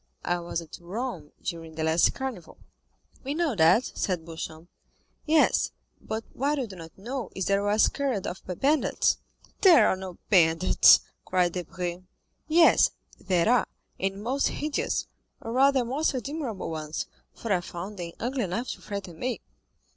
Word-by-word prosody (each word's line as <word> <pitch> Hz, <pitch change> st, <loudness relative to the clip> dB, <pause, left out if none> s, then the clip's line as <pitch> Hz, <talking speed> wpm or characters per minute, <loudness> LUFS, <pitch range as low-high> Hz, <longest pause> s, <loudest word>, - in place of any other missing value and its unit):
"I 175 Hz, 0 st, +1 dB
was 170 Hz, 0 st, -3 dB
at 165 Hz, -, -11 dB
Rome 185 Hz, -, -5 dB
during 165 Hz, -2 st, -5 dB
the 160 Hz, -, -2 dB
last 160 Hz, +1 st, +4 dB
Carnival." 260 Hz, -, -6 dB, 0.7 s
"We 275 Hz, +2 st, -3 dB
know 330 Hz, -4 st, +1 dB
that," 180 Hz, +7 st, +5 dB
said 180 Hz, -4 st, -2 dB
Beauchamp. 160 Hz, 0 st, -7 dB, 0.6 s
"Yes, 310 Hz, 0 st, +3 dB, 0.3 s
but 220 Hz, +1 st, -4 dB
what 285 Hz, +3 st, 0 dB
you 265 Hz, -, -1 dB
do 200 Hz, -4 st, -10 dB
not 165 Hz, -2 st, -11 dB
know 240 Hz, +3 st, -5 dB
is 190 Hz, -, -2 dB
that 200 Hz, 0 st, +2 dB
I -, -, -2 dB
was 205 Hz, +1 st, +4 dB
carried 265 Hz, -9 st, -2 dB
off 180 Hz, -, -5 dB
by 180 Hz, -, -5 dB
bandits." 290 Hz, -, +2 dB, 0.4 s
"There 360 Hz, -5 st, +7 dB
are -, -, +2 dB
no 185 Hz, -2 st, -8 dB
bandits," 165 Hz, -2 st, +6 dB, 0.2 s
cried 180 Hz, -1 st, +1 dB
Debray. 175 Hz, 0 st, -4 dB, 0.5 s
"Yes 330 Hz, +1 st, +6 dB, 0.3 s
there 180 Hz, -2 st, +1 dB
are, 245 Hz, +1 st, +4 dB, 0.3 s
and 195 Hz, +2 st, -2 dB
most 265 Hz, +4 st, +1 dB
hideous, 300 Hz, 0 st, -1 dB, 0.3 s
or 225 Hz, -, -6 dB
rather 265 Hz, 0 st, +4 dB
most 275 Hz, +4 st, 0 dB
admirable 255 Hz, -, -4 dB
ones, 155 Hz, -1 st, -4 dB, 0.3 s
for 225 Hz, -3 st, -1 dB
I 180 Hz, -, +1 dB
found 180 Hz, +3 st, -7 dB
them 170 Hz, -1 st, -5 dB
ugly 250 Hz, -1 st, -1 dB
enough 200 Hz, +8 st, -3 dB
to -, -, -6 dB
frighten 195 Hz, -5 st, -6 dB
me." 250 Hz, 0 st, -2 dB
195 Hz, 160 wpm, -27 LUFS, 175-260 Hz, 0.7 s, There